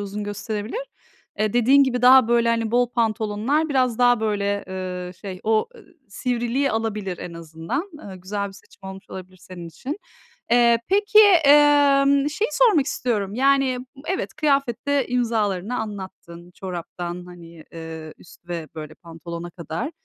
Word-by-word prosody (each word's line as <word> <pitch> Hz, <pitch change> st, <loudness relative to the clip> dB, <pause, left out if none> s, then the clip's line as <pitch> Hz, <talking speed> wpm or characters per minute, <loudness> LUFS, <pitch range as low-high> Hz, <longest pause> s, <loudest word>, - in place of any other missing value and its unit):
uzun 205 Hz, +1 st, -5 dB
gösterebilir. 210 Hz, -, -4 dB, 0.6 s
Eee, 215 Hz, 0 st, 0 dB
dediğin 260 Hz, +4 st, +5 dB
gibi 250 Hz, -2 st, -2 dB
daha, 255 Hz, -1 st, +7 dB
böyle, 235 Hz, -1 st, +3 dB
hani 230 Hz, -1 st, 0 dB
bol 245 Hz, 0 st, +2 dB
pantolonlar 225 Hz, +6 st, 0 dB
biraz 255 Hz, -4 st, +1 dB
daha 245 Hz, -2 st, +4 dB
böyle, 205 Hz, -2 st, -1 dB
eee, 180 Hz, -1 st, -5 dB
şey 190 Hz, -3 st, -7 dB
o 220 Hz, -, +1 dB
e -, -, -15 dB, 0.3 s
sivriliği 245 Hz, +5 st, -1 dB
alabilir 215 Hz, -5 st, -3 dB
en 170 Hz, -, -8 dB
azından. 165 Hz, -, -5 dB
Eee, 195 Hz, -9 st, -10 dB
güzel 200 Hz, +2 st, -4 dB
bir -, -, -12 dB
seçim 195 Hz, -1 st, -14 dB
olmuş 190 Hz, 0 st, -12 dB
olabilir 185 Hz, 0 st, -9 dB
senin 175 Hz, -2 st, -10 dB
için. 285 Hz, -, -6 dB, 0.5 s
Eee, 235 Hz, -1 st, +5 dB
peki, 415 Hz, +2 st, +3 dB, 0.3 s
emm, 285 Hz, -1 st, +5 dB
şeyi 425 Hz, +9 st, -1 dB
sormak 410 Hz, -, +4 dB
istiyorum 210 Hz, -8 st, -2 dB
yani, 270 Hz, 0 st, +2 dB, 0.3 s
evet, 375 Hz, +1 st, -3 dB
kıyafette 280 Hz, -2 st, 0 dB
imzalarını 225 Hz, -3 st, -1 dB
anlattın, 185 Hz, -5 st, -8 dB
çoraptan, 175 Hz, -1 st, -6 dB
hani, 170 Hz, -2 st, -13 dB
eee, 160 Hz, -1 st, -8 dB
üst 175 Hz, 0 st, -18 dB
ve 165 Hz, -3 st, -5 dB
böyle 155 Hz, -1 st, -8 dB
pantolona 170 Hz, 0 st, -9 dB
kadar. 170 Hz, -, -5 dB
215 Hz, 145 wpm, -22 LUFS, 185-260 Hz, 0.6 s, daha